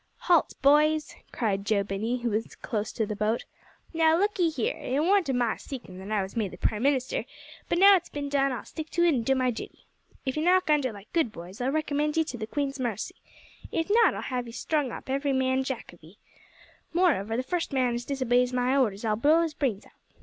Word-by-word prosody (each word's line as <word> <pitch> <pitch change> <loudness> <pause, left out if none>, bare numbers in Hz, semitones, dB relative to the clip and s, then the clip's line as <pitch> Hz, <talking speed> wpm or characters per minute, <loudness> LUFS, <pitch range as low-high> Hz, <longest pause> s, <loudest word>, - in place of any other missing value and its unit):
"Halt! 345 -3 +3
boys," 300 +2 +4 0.2
cried 200 -4 -1
Joe 205 -1 +1
Binney, 220 +5 -3
when 220 -1 +1 0.2
close 215 -1 -2
to 220 - -1
the 210 0 -4
boat. 215 +3 -1 0.5
"Now, 325 0 +4
look 405 +2 0
'ee 340 -2 +4
here. 275 -8 -1
It 265 +3 -2
warn't 365 0 +3
o' - - +1
my 240 -2 +1
seekin' 230 -9 -9
that 190 +2 -8
I 210 -2 +1
was 190 - -8
made 210 -5 -3
prime 210 - 0
minister, 265 -1 +1 0.5
but 345 - +1
now 395 +3 +8
that 390 - +7
it's 350 - -8
bin 290 -1 -4
done 275 -1 +1
I'll 245 -4 -5
stick 315 -1 -7
to 345 - +1
it 340 -2 +4
an' 250 - +1
do 270 +4 +1
my 255 -1 +1
duty. 225 - -9 0.4
If 265 +2 -2
ye 305 - 0
knock 360 -1 +3
under 285 -5 +2
like 205 -1 -13
good 320 -9 +1
boys 185 +3 -10
I'll 250 - +1
recommend 300 +1 0
ye 320 - +4
to 285 -6 -6
the 215 - -4
queen's 280 +2 -2
marcy. 230 -4 -3 0.5
If 325 +4 -1
not 460 +1 +5
I'll - - -4
have 250 -2 -3
'ee - - -8
strung 290 0 -1
up, - - -8
every 275 +1 0
man 260 0 +1
jack 260 -8 -5
of 175 - -19
'ee. 165 +6 -16 0.8
Moreover, 260 - +2
the 255 - -1
first 335 +6 -2
man 255 -3 +1
as 240 +1 -3
disobeys 250 -2 +1
my 250 +1 +1
orders 225 -6 +1
I'll 215 -1 +2
blow 305 +9 +4
his 325 -2 -3
brains 250 -10 -2
out. - - -19
260 Hz, 230 wpm, -27 LUFS, 225-305 Hz, 0.8 s, now